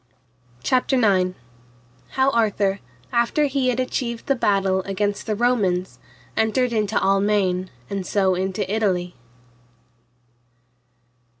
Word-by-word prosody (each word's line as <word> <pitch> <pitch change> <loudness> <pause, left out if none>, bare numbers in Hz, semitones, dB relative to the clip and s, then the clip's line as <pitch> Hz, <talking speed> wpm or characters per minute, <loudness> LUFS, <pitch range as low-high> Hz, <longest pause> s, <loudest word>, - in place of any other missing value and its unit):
CHAPTER 255 - +2
IX. 185 -5 +2 0.8
How 265 +1 +3
Arthur, 205 -4 +1 0.3
after 235 +6 +2
he 275 -2 0
had 250 0 0
achieved 240 -2 -2
the 275 - +2
battle 195 -5 +1
against 205 +2 -2
the 215 - 0
Romans, 200 -6 0 0.4
entered 235 +3 +1
into 215 -1 0
Almaine, 195 -2 +1 0.2
and 195 -1 -3
so 190 0 +1
into 190 +2 -2
Italy. 190 -4 -1
205 Hz, 105 wpm, -22 LUFS, 190-235 Hz, 0.8 s, How